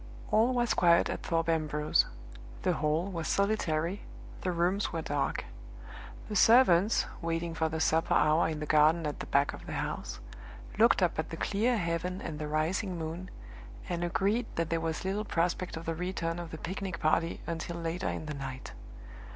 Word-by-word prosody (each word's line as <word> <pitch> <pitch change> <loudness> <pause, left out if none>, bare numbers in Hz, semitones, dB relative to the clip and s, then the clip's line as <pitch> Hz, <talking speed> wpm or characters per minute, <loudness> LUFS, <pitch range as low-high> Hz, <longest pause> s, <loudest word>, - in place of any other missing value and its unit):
All 225 +4 +4
was 240 -1 +1
quiet 170 -1 +4
at - - -4
Thorpe 165 -1 0
Ambrose. 155 -2 +2 0.6
The 180 - +2
hall 155 +4 0
was 165 -3 -3
solitary, 195 -3 0 0.4
the 185 - -1
rooms 180 +4 0
were - - -3
dark. - - -1 0.8
The 210 - -5
servants, 215 -3 +5 0.2
waiting 165 0 -2
for 160 0 0
the 160 0 -3
supper 160 +1 +2
hour 155 +2 +4
in 155 -2 -3
the - - -2
garden 155 +2 +4
at 150 - -3
the - - -6
back 140 +1 +2
of - - -10
the - - -5
house, - - -4 0.6
looked - - +5
up - - +1
at - - -2
the - - -6
clear 230 +4 +1
heaven 180 0 -2
and 150 -2 -6
the 150 - -3
rising 175 +5 -1
moon, 165 +3 -5 0.6
and 175 -2 -2
agreed 200 +7 +1
that 165 0 -1
there 165 0 +1
was 165 +2 -3
little 200 +3 -1
prospect 180 -2 -1
of 165 - -7
the 165 - -1
return 175 0 -3
of 170 -1 -6
the 160 - -7
picnic 185 0 -4
party 165 +2 +1
until 170 +1 -4
later 170 +2 -3
in - - -4
the 150 - -4
night. 135 -2 -7
170 Hz, 185 wpm, -30 LUFS, 160-185 Hz, 0.8 s, servants